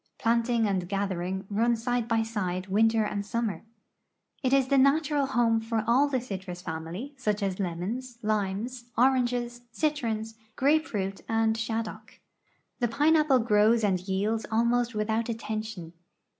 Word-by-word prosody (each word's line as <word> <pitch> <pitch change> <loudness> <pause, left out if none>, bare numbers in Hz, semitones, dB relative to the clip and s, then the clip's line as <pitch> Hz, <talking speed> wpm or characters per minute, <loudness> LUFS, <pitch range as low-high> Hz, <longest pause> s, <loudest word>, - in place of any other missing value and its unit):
Planting 230 0 +2
and 185 -3 -1
gathering 190 -1 -2
run 230 +4 +2
side 240 0 -1
by 225 -1 +2
side 185 -5 -3
winter 220 +3 +3
and 205 -1 -2
summer. 225 0 -2 0.8
It 260 -3 0
is 270 -1 +3
the 275 -1 +4
natural 285 +1 +3
home 235 -3 +2
for 225 -1 -2
all 255 +6 +4
the 265 -3 0
citrus 190 -6 -6
family, 170 - -6
such 210 -5 -1
as 195 -1 -2
lemons, 205 +8 -4
limes, 215 +4 -2
oranges, 245 -1 +2
citrons, 230 -7 -1 0.2
grape 310 +4 +3
fruit, 195 -2 -3
and 225 0 +2
shaddock. 225 0 -4 0.6
The 240 - +2
pineapple 300 +2 +4
grows 220 +1 +3
and 190 -3 +2
yields 200 +4 -1
almost 235 +1 +1
without 220 +2 -1
attention. 215 -6 -5
225 Hz, 140 wpm, -28 LUFS, 200-245 Hz, 0.8 s, the